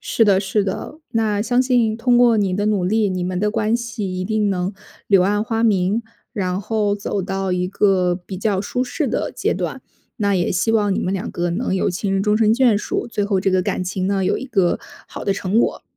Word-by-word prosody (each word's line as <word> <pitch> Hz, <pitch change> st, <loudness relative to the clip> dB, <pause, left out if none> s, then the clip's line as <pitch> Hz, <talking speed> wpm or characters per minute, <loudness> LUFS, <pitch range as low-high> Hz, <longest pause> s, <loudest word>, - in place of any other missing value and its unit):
是 225 Hz, -, +2 dB
的， 195 Hz, -2 st, +4 dB
是 200 Hz, +1 st, 0 dB
的， 200 Hz, +9 st, -5 dB
那 215 Hz, -2 st, 0 dB
相 245 Hz, +2 st, +2 dB
信 245 Hz, -4 st, +2 dB
通 240 Hz, +1 st, +2 dB
过 240 Hz, -2 st, +5 dB
你 195 Hz, -3 st, +1 dB
的 205 Hz, +2 st, -1 dB
努 205 Hz, -4 st, +1 dB
力， 215 Hz, 0 st, +2 dB
你 185 Hz, -1 st, -2 dB
们 180 Hz, 0 st, -2 dB
的 210 Hz, +2 st, +1 dB
关 220 Hz, +1 st, +1 dB
系 220 Hz, -6 st, -4 dB
一 185 Hz, -, -2 dB
定 215 Hz, 0 st, 0 dB
能 185 Hz, 0 st, -1 dB, 0.4 s
柳 195 Hz, -3 st, +5 dB
暗 205 Hz, +3 st, +1 dB
花 225 Hz, -1 st, -1 dB
明， 205 Hz, 0 st, +2 dB, 0.3 s
然 185 Hz, -5 st, -2 dB
后 210 Hz, 0 st, 0 dB
走 205 Hz, 0 st, -3 dB
到 190 Hz, 0 st, -2 dB
一 180 Hz, 0 st, -1 dB
个 190 Hz, -2 st, +2 dB
比 190 Hz, -, -7 dB
较 200 Hz, -1 st, 0 dB
舒 245 Hz, +5 st, -2 dB
适 255 Hz, -, -2 dB
的 -, -, -1 dB
阶 -, -, 0 dB
段。 -, -, -4 dB, 0.4 s
那 200 Hz, -2 st, +1 dB
也 175 Hz, -2 st, +1 dB
希 215 Hz, +5 st, +1 dB
望 205 Hz, -3 st, +2 dB
你 -, -, -1 dB
们 185 Hz, -, -1 dB
两 190 Hz, -, -3 dB
个 175 Hz, 0 st, -2 dB
能 190 Hz, +3 st, -1 dB
有 190 Hz, -, +1 dB
情 190 Hz, +3 st, -3 dB
人 195 Hz, 0 st, +1 dB
终 210 Hz, +1 st, +2 dB
身 220 Hz, -1 st, +4 dB
眷 240 Hz, -4 st, +4 dB
属， -, -, -3 dB
最 210 Hz, -4 st, -2 dB
后 200 Hz, -2 st, +1 dB
这 195 Hz, +1 st, +1 dB
个 185 Hz, 0 st, +3 dB
感 180 Hz, -, -2 dB
情 185 Hz, 0 st, -2 dB
呢， 195 Hz, -1 st, 0 dB
有 -, -, +1 dB
一 265 Hz, -, -6 dB
个 195 Hz, -9 st, +1 dB, 0.3 s
好 -, -, -8 dB
的 195 Hz, -, 0 dB
成 195 Hz, +2 st, 0 dB
果。 -, -, -1 dB
205 Hz, 255 characters per minute, -20 LUFS, 185-220 Hz, 0.4 s, 过